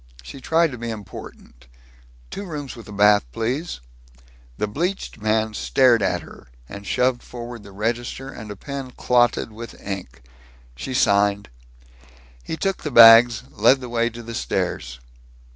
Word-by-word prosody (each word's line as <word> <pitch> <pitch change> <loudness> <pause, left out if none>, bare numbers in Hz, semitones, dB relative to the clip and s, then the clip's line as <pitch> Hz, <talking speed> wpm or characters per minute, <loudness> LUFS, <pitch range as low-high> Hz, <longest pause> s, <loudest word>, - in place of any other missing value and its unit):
She 130 - -10
tried 160 +3 +2
to 125 - -8
be 120 0 -5
important: 95 - -10 0.6
"Two 200 - -5
rooms 145 -7 -6
with 110 -4 -10
bath, 105 0 +5
please." 125 - -3 0.8
The - - 0
bleached 170 - -3
man 110 0 +1
stared 120 0 +3
at - - 0
her, - - -14 0.2
and 100 +4 -10
shoved 125 -1 +1
forward 120 -1 -9
the 100 -1 -13
register 120 +6 -3
and 115 -5 -9
a 105 - -6
pen 135 +4 -6
clotted 120 -2 +2
with 115 +2 -10
ink. 90 -12 -7 0.5
She 130 - -5
signed. 100 -2 +2 0.9
He 160 - -5
took 195 +1 -2
the 150 - -3
bags, 115 -2 +8
led 120 +5 +4
the 125 -2 -8
way 115 0 +1
to 120 0 -10
the 115 0 -8
stairs. - - -3
115 Hz, 150 wpm, -22 LUFS, 105-130 Hz, 0.9 s, bags